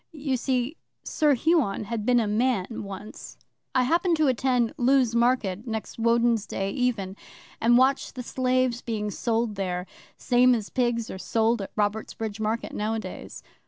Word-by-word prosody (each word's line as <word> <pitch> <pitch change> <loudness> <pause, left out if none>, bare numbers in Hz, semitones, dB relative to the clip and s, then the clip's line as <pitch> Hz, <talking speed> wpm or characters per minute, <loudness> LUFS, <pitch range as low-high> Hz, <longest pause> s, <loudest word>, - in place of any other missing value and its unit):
You 280 -3 -2
see, 255 +3 -1 0.3
Sir 295 -2 +2
Huon 270 - +1
had 225 0 -4
been 245 -1 +5
a 225 - +1
man 215 -1 +1 0.2
once. 200 +2 -9 0.4
'I 255 - +4
happened 335 +5 +2
to 310 -1 +3
attend 250 -1 +1
Lewes 260 -3 +3
Market 235 -3 +1
next 220 0 -5
Woden's 230 -1 +2
Day 195 0 -2
even, 215 -6 -1 0.5
and 240 +1 +5
watched 265 +2 +2
the 250 - -5
slaves 255 -1 0
being 210 -3 -3
sold 230 +1 -1
there 180 -2 -3 0.3
same 250 0 +4
as 215 -3 -5
pigs 240 -2 0
are 190 - -7
sold 225 +2 +1
at 195 - -8
Robertsbridge 215 0 -2
Market 220 +2 -2
nowadays. 220 +1 -4
235 Hz, 155 wpm, -26 LUFS, 215-255 Hz, 0.5 s, been